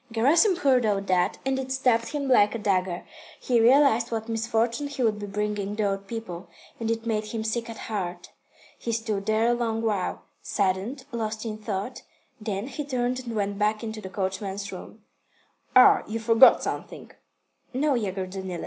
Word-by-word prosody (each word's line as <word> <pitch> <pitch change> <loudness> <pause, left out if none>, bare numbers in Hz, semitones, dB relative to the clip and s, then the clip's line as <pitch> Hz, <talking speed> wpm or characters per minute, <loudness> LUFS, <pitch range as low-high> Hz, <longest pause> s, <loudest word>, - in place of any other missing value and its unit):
Gerasim 305 - +4
heard 265 -7 +3
all 205 -3 +2
that, 185 -2 +1
and 265 0 0
it 260 0 -5
stabbed 250 -3 +2
him 290 -2 -3
like 210 -4 +4
a - - 0
dagger. 185 -4 -1 0.3
He 240 -3 +2
realised 240 -1 +5
what 220 -1 -3
misfortune 225 +3 0
he 280 -3 -3
would 215 -2 +1
be 205 - -5
bringing 205 0 -2
the 210 -1 +1
old 195 0 -5
people, 205 -6 -6 0.3
and 225 -1 -2
it 230 0 -1
made 215 -2 -1
him 220 +1 -4
sick 230 +1 -2
at 225 - -7
heart. 180 -5 -5 0.5
He 235 - -3
stood 220 -3 -2
there 220 +1 +2
a - - +4
long 230 -2 -1
while, 205 -5 -1 0.2
saddened, 200 +7 -1
lost 220 -1 -3
in 215 -1 -4
thought, 215 +3 -4 0.4
then 210 -1 -3
he 280 +3 -5
turned 255 -2 -1
and 235 -3 -6
went 200 -1 -2
back 210 +2 +1
into 220 -1 -5
the 190 - -7
coachman's 195 +1 -3
room. - - -10 0.7
"Ah, 255 - +8
you 220 - -3
forgot 230 +3 +6
something?" - - -5 0.6
"No, 280 +3 +1
Yegor 195 -6 -2
Danilych." 185 -2 -6
220 Hz, 180 wpm, -26 LUFS, 200-240 Hz, 0.7 s, Ah